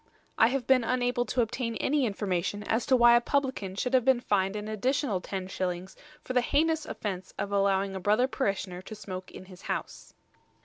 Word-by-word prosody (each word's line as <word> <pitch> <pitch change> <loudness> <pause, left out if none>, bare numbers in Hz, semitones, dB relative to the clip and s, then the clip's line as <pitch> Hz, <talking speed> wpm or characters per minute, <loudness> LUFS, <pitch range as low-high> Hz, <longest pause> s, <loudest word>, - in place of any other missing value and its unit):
I 225 - +5
have 255 0 -1
been 260 -2 +4
unable 245 0 0
to 250 - +2
obtain 230 0 -3
any 275 +2 +1
information 200 -1 -2
as 225 +3 -1
to 265 - +5
why 240 -1 +7
a 240 - +5
publican 260 -9 -1
should 250 +5 -2
have 255 -2 +5
been 260 -1 +4
fined 195 -4 0
an 210 0 -4
additional 220 -1 0
10s. 185 -1 -4 0.3
for 255 - -4
the 250 - +4
heinous 315 +4 +1
offence 190 -3 -5
of 205 - -3
allowing 195 -1 +1
a - - -3
brother 210 +7 +2
parishioner 195 -8 -2
to 215 +3 -9
smoke 185 -3 -7
in - - -11
his 185 -1 -14
house. - - -5
215 Hz, 190 wpm, -28 LUFS, 195-255 Hz, 0.3 s, why